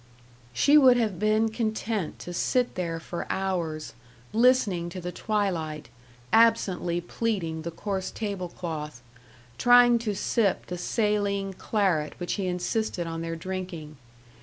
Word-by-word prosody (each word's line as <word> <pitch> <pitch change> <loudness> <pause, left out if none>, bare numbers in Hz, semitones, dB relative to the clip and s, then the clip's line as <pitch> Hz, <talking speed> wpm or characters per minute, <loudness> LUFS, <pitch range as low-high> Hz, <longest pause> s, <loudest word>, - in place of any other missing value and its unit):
She 285 - +5
would 255 -3 +6
have 215 -7 0
been 215 +1 +2
content 220 -4 -2
to 175 - -7
sit 245 +7 +1
there 170 -2 -3
for 170 +1 -6
hours, 170 -5 -2 0.4
listening 220 -7 +3
to 185 - -7
the 180 0 -5
twilight, 170 - -2 0.4
absently 200 -6 +3
pleating 175 -4 -2
the 165 - -4
coarse 190 +2 -3
table 200 -5 -4
cloth, 150 -8 -6 0.6
trying 245 -1 +6
to 215 -3 -2
sip 200 0 +1
the 180 - -5
saline 200 -1 0
claret 185 -7 0
which 175 - -2
he 195 -3 -2
insisted 180 +1 -1
on 165 0 -4
their 165 0 -3
drinking. 170 -3 -6
190 Hz, 135 wpm, -27 LUFS, 170-220 Hz, 0.6 s, would